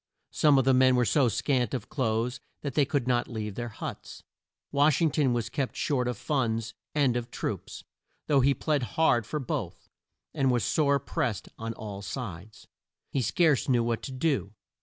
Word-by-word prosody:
Some 150 -2 +4
of 135 - +3
the 135 - +5
men 130 0 +5
were 125 -1 +3
so 135 +1 +3
scant 125 +3 0
of 120 -3 -5
clothes 120 -2 -1 0.2
that 140 -3 -3
they 145 +1 +3
could 140 -2 -1
not 120 -1 +1
leave 110 -3 -4
their 120 +3 -4
huts. 110 - -8 0.5
Wash 145 0 +4
ing 165 -3 +3
ton 140 -4 +2
was 120 -2 -1
kept 135 -3 -3
short 125 -4 0
of 125 -3 -2
funds 115 -5 -1 0.2
and 140 -5 +3
of 120 0 -3
troops, - - -5 0.4
though 140 -2 +3
he 140 +1 +3
plead 150 -3 0 0.2
hard 120 -9 +3
for 150 - -2
both, 130 - -4 0.4
and 135 -1 +1
was 120 -2 +2
sore 140 -2 +2
pressed 140 - -3
on 115 0 -4
all 105 -3 -7
sides. 105 -3 -7 0.5
He 135 - 0
scarce 155 +1 +2
knew 120 -2 +3
what 115 -1 -1
to 135 - -6
do. 130 - -1
125 Hz, 185 wpm, -28 LUFS, 115-140 Hz, 0.5 s, the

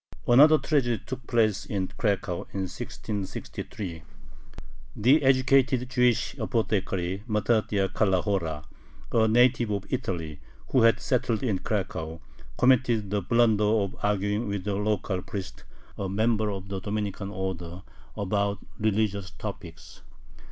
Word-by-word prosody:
Another 150 +6 +7
tragedy 135 -6 0
took 130 -1 -7
place 110 -4 +2
in 95 -3 -3
Cracow, 95 -2 -2
in 95 - -2
1663. 95 -2 -6 0.9
The 130 +8 +4
educated 130 -1 +3
Jewish 125 -2 +2
apothecary 95 -4 -1
Mattathiah 105 -2 +1
Calahora, 95 -6 0 0.5
a 110 -1 +3
native 120 0 +4
of 100 -1 -2
Italy 80 -5 -3 0.3
who 130 - +4
had 115 0 +5
settled 125 -3 0
in 105 -7 0
Cracow, 80 -6 -3 0.4
committed 120 -5 +3
the 105 -1 +1
blunder 110 +2 +3
of 105 -2 +1
arguing 105 +2 0
with 100 -1 -3
a 100 - 0
local 100 -2 -1
priest, 95 +1 -7 0.3
a 95 - -2
member 110 +2 +1
of 95 -1 -6
the 95 -1 -4
Dominican 105 -1 -3
order, 95 -2 -5 0.3
about 100 0 0 0.2
religious 105 -2 0
topics. - - -9
105 Hz, 120 wpm, -27 LUFS, 95-115 Hz, 0.9 s, Another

